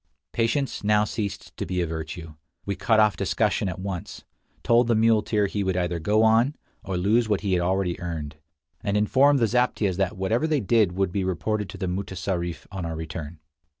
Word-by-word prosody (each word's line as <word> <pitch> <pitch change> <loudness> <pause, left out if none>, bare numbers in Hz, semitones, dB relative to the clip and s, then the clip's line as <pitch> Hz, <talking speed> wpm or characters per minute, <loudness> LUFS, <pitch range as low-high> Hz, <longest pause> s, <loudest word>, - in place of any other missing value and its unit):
Patience 120 +4 0
now 105 0 +4
ceased 105 -1 -4
to - - -2
be 90 +1 -2
a 85 - +1
virtue. 80 0 -6 0.3
We 100 - -2
cut 110 +1 +2
off 105 -2 +4
discussion 95 - 0
at 90 - -5
once; 95 -2 -6 0.4
told 120 0 +4
the 115 - +3
muleteer 110 -1 +3
he 100 +1 -2
would 95 -1 0
either 90 -1 -1
go 105 +7 +2
on, 115 +6 +4 0.3
or 95 -2 -3
lose 110 +5 +2
what 105 -3 +1
he 100 -2 0
had 90 - +2
already 90 0 0
earned; 80 -4 -5 0.5
and 100 0 0
informed 135 +7 +4
the 120 - +3
zaptiehs 110 -5 +1
that 95 +2 -1
whatever 110 +10 +1
they 155 -2 +2
did 110 -4 +2
would 95 -1 0
be 95 +1 -1
reported 105 +3 -2
to - - -8
the 95 - -3
mutessarif 90 -2 -3
on 95 -2 -5
our 85 -1 -3
return. 80 0 -6
100 Hz, 195 wpm, -25 LUFS, 90-110 Hz, 0.5 s, now